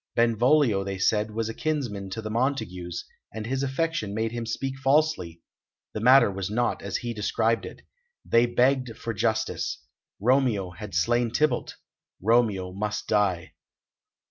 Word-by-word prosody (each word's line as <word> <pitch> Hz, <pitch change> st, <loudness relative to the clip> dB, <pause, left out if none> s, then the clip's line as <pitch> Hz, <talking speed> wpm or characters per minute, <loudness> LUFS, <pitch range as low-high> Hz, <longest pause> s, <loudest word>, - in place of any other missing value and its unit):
Benvolio, 120 Hz, -1 st, +3 dB
they 95 Hz, 0 st, -4 dB
said, 105 Hz, +3 st, +1 dB
was 110 Hz, +1 st, -2 dB
a 115 Hz, -, -4 dB
kinsman 120 Hz, -11 st, -3 dB
to 110 Hz, +4 st, -5 dB
the 110 Hz, -, -4 dB
Montagues, 110 Hz, -9 st, -2 dB, 0.3 s
and 110 Hz, 0 st, -6 dB
his 130 Hz, +3 st, -2 dB
affection 135 Hz, -6 st, -1 dB
made 110 Hz, +1 st, -1 dB
him 120 Hz, -1 st, -4 dB
speak 135 Hz, +3 st, -3 dB
falsely; 135 Hz, -, +1 dB, 0.5 s
the -, -, -3 dB
matter 125 Hz, -1 st, +6 dB
was 95 Hz, -1 st, -4 dB
not 120 Hz, +3 st, 0 dB
as 100 Hz, -1 st, -2 dB
he 120 Hz, -1 st, -4 dB
described 110 Hz, +2 st, 0 dB
it. -, -, -12 dB, 0.4 s
They 115 Hz, +1 st, +4 dB
begged 125 Hz, -1 st, +1 dB
for 115 Hz, -, -4 dB
justice. 110 Hz, +2 st, -1 dB, 0.4 s
Romeo 115 Hz, -5 st, +2 dB
had 105 Hz, +2 st, -8 dB
slain 120 Hz, +7 st, +2 dB
Tybalt; 135 Hz, +1 st, 0 dB, 0.4 s
Romeo 105 Hz, -4 st, +2 dB
must 105 Hz, +2 st, -3 dB
die. 100 Hz, -5 st, +1 dB
115 Hz, 145 wpm, -26 LUFS, 100-125 Hz, 0.5 s, matter